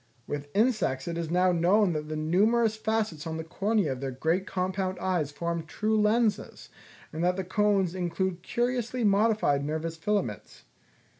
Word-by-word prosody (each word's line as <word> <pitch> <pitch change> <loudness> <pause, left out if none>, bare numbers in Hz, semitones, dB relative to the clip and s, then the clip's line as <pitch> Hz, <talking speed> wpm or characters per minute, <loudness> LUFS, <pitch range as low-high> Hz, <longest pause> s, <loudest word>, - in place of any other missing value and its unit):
With 145 0 -5
insects 210 - +1
it 170 - -3
is 165 -2 -3
now 180 +2 +3
known 180 +3 +3
that 150 0 -4
the 155 - -3
numerous 210 +9 +2
facets 215 -8 -2
on 160 0 -3
the 160 - -4
cornea 200 0 0
of 130 0 -5
their 135 - -2
great 160 +9 -1
compound 185 0 -2
eyes 180 -6 -1
form 170 +3 -3
true 215 +7 -1
lenses, 215 +1 0 0.4
and 160 +2 -3
that 180 +1 +2
the 190 - -2
cones 195 -1 +1
include 185 0 -2
curiously 245 +3 -1
modified 205 -8 +3
nervous 160 +2 -3
filaments. 160 - -3
185 Hz, 160 wpm, -28 LUFS, 160-210 Hz, 0.4 s, now